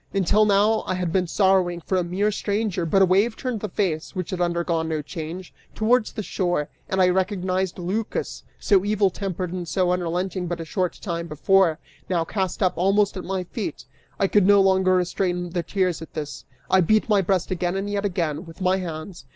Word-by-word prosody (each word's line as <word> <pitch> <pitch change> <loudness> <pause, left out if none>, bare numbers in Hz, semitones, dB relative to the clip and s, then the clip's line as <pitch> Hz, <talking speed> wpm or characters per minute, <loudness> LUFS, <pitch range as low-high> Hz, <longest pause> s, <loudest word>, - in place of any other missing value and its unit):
Until 200 +3 +3
now, 210 +2 +3
I 185 - 0
had 180 -2 -2
been 185 -2 +1
sorrowing 185 -2 +2
for 180 +3 -2
a 180 - +2
mere 190 +5 0
stranger, 200 -4 -1
but 195 +4 +4
a - - +7
wave 200 +5 +2
turned 250 -4 -3
the 215 - -4
face, 165 -6 -2
which 185 -3 -4
had 180 -1 -3
undergone 170 -2 0
no 155 -2 -2
change, 165 +4 -7 0.2
towards 220 +1 +2
the 215 - -5
shore, 175 -6 -1 0.2
and 190 - -1
I 185 -1 +5
recognized 185 0 0
Lycas; 195 +5 -3 0.2
so 195 -2 +3
evil 205 -2 +2
tempered 185 -2 -4
and 180 -2 -4
so 180 +1 +1
unrelenting 180 +1 -2
but 175 0 -3
a 165 - -5
short 180 +1 -2
time 170 -3 -3
before, 170 +1 +3 0.3
now 170 -3 +1
cast 190 +1 -2
up 185 - +3
almost 195 +3 +2
at 185 - -5
my 190 0 -2
feet! 210 +4 -5 0.3
I - - +3
could 195 -1 +3
no 205 0 +7
longer 190 -1 +4
restrain 180 -1 -1
the 175 0 -1
tears, 180 -1 -1
at 160 - -11
this; 145 -3 -6 0.2
I 190 - +4
beat 215 +5 +3
my 210 -3 +4
breast 185 0 0
again 180 0 -1
and 195 +1 -2
yet 205 0 -2
again, 170 -4 -2
with 165 - -12
my 185 0 +2
hands. 170 0 -7
185 Hz, 205 wpm, -24 LUFS, 175-195 Hz, 0.3 s, a